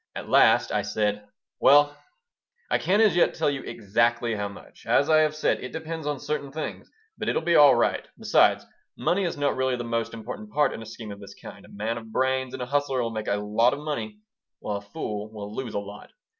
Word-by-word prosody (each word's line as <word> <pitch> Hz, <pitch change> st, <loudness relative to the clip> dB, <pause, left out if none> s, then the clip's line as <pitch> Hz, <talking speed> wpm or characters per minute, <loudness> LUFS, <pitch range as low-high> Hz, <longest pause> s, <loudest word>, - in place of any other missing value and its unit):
At -, -, -7 dB
last -, -, +5 dB
I -, -, +1 dB
said: 105 Hz, -1 st, -2 dB, 0.3 s
"Well, 145 Hz, +1 st, +5 dB, 0.8 s
I -, -, +3 dB
can't 205 Hz, +4 st, +3 dB
as 210 Hz, -5 st, +4 dB
yet 175 Hz, -, +3 dB
tell 155 Hz, -2 st, +1 dB
you 140 Hz, -1 st, -4 dB
exactly 115 Hz, +1 st, 0 dB
how 105 Hz, -1 st, -2 dB
much. 100 Hz, -, -14 dB
As 145 Hz, +3 st, +3 dB
I 155 Hz, -, +6 dB
have 155 Hz, 0 st, +2 dB
said, 155 Hz, -, +1 dB
it 125 Hz, -, -6 dB
depends 160 Hz, -1 st, -5 dB
on 145 Hz, -2 st, -2 dB
certain 145 Hz, -1 st, -4 dB
things, 155 Hz, +2 st, -6 dB, 0.3 s
but -, -, -1 dB
it'll -, -, 0 dB
be 170 Hz, +1 st, +2 dB
all 145 Hz, -2 st, +8 dB
right. -, -, 0 dB
Besides, -, -, +3 dB, 0.3 s
money 185 Hz, +3 st, +1 dB
is 170 Hz, -, -3 dB
really 130 Hz, -2 st, 0 dB
not -, -, -1 dB
the 120 Hz, -, -4 dB
most 115 Hz, -1 st, -2 dB
important 210 Hz, -, -8 dB
part 150 Hz, -5 st, +2 dB
in -, -, -7 dB
a 115 Hz, -, -9 dB
scheme 110 Hz, -1 st, -8 dB
of 100 Hz, -, -9 dB
this 100 Hz, -, -11 dB
kind. -, -, -11 dB
A -, -, -17 dB
man 110 Hz, +3 st, -3 dB
of 110 Hz, -1 st, -13 dB
brains 130 Hz, +1 st, 0 dB
and 125 Hz, -, -4 dB
a -, -, -3 dB
hustler 135 Hz, -1 st, 0 dB
will 115 Hz, -, -2 dB
make 110 Hz, -1 st, -5 dB
a 100 Hz, -, +1 dB
lot 105 Hz, +4 st, +2 dB
of 140 Hz, -, -4 dB
money, 115 Hz, -9 st, -4 dB, 0.4 s
while 105 Hz, -1 st, -3 dB
a -, -, -8 dB
fool 105 Hz, +1 st, -6 dB
will 105 Hz, -1 st, -8 dB
lose 125 Hz, -4 st, -5 dB
a -, -, +1 dB
lot. 100 Hz, 0 st, -10 dB
125 Hz, 230 wpm, -26 LUFS, 110-145 Hz, 0.8 s, all